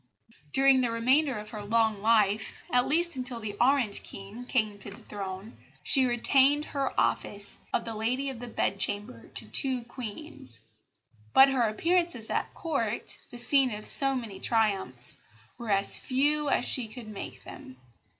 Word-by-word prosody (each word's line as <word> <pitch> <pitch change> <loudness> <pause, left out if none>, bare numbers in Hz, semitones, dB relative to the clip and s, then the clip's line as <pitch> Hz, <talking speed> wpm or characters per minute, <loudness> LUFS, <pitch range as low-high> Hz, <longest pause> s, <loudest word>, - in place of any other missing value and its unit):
During 270 -1 +5
the 245 - +1
remainder 255 +4 +1
of 210 0 -9
her 215 - -7
long 220 0 0
life, 215 -1 +1
at 250 0 +2
least 340 +2 0
until 250 -2 -3
the 210 -2 -6
Orange 250 -5 +2
King 200 +5 -9
came 215 -5 -1
to - - -10
the 200 - -12
Throne, 195 +1 -8 0.3
she 265 -2 +3
retained 270 +4 +3
her 275 -2 -3
office 205 0 -2
of 235 - -1
Lady 235 +5 -3
of 250 - -10
the 245 - -8
Bedchamber 200 - -2
to 115 - -1
two 250 - +6
Queens; 230 - -9 0.7
but 270 +1 +7
her 255 -4 +1
appearances 335 -1 -1
at - - -2
Court, 240 -9 -3
the 245 - -11
scene 265 +2 +4
of 210 - -8
so 270 -1 +3
many 220 -7 -7
triumphs, 195 - +1 0.4
were 235 -2 -7
as 200 0 +5
few 290 +3 0
as 250 - +1
she 245 -4 +3
could 220 +1 -10
make 210 -2 -9
them. 130 - -12
235 Hz, 160 wpm, -27 LUFS, 210-270 Hz, 0.7 s, but